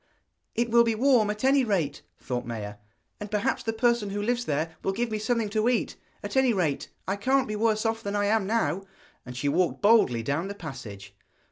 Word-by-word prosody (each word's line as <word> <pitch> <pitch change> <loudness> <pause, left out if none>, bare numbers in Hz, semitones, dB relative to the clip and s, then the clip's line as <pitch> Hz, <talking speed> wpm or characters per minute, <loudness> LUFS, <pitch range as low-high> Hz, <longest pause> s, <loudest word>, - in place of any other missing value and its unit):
'It 235 +1 +1
will 235 0 +6
be 230 -1 0
warm, 240 -3 +3
at 210 +2 -4
any 270 0 +4
rate,' 175 - -1 0.2
thought 125 -2 -3
Maia, 105 -3 -6 0.4
'and 210 - -6
perhaps 210 -1 0
the 225 - -2
person 235 -2 +1
who 200 +1 -3
lives 240 +3 -1
there 160 +1 -2
will 195 - -1
give 235 +3 -2
me 215 - -1
something 225 0 0
to 215 +2 +1
eat. 250 - 0 0.3
At - - -5
any 265 -3 +4
rate, 160 -8 -1 0.2
I 190 - 0
can't 260 +6 +1
be 215 - -3
worse 215 0 +1
off 225 0 0
than 200 -1 -4
I 205 0 +1
am 210 -1 +1
now.' 195 -4 0 0.4
And 125 0 -7
she 145 - -1
walked 180 +7 +1
boldly 200 - +4
down 145 +9 -1
the 200 - -6
passage. 105 - -9
210 Hz, 215 wpm, -27 LUFS, 160-230 Hz, 0.4 s, will